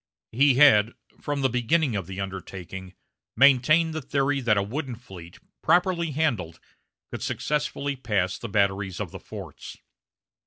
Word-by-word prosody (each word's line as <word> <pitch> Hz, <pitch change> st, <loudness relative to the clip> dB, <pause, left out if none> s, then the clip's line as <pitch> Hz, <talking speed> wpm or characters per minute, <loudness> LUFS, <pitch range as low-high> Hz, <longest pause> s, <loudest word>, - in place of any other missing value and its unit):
He 135 Hz, +3 st, +4 dB
had, 115 Hz, -6 st, +6 dB, 0.3 s
from 145 Hz, -1 st, -3 dB
the -, -, +5 dB
beginning 125 Hz, +2 st, +1 dB
of 95 Hz, -4 st, -3 dB
the 95 Hz, 0 st, -7 dB
undertaking, 95 Hz, -1 st, -7 dB, 0.4 s
maintained 140 Hz, +5 st, +5 dB
the 155 Hz, -, -3 dB
theory 140 Hz, +1 st, 0 dB
that 110 Hz, -4 st, +2 dB
a 100 Hz, -, +2 dB
wooden 130 Hz, +4 st, -4 dB
fleet, 95 Hz, -8 st, -12 dB, 0.2 s
properly 175 Hz, 0 st, +2 dB
handled, 120 Hz, -, -1 dB, 0.5 s
could -, -, -6 dB
successfully 145 Hz, -1 st, -2 dB
pass 105 Hz, -7 st, -1 dB
the 115 Hz, -, -6 dB
batteries 100 Hz, -2 st, 0 dB
of -, -, -4 dB
the -, -, -8 dB
forts. -, -, -10 dB
125 Hz, 145 wpm, -25 LUFS, 95-145 Hz, 0.5 s, had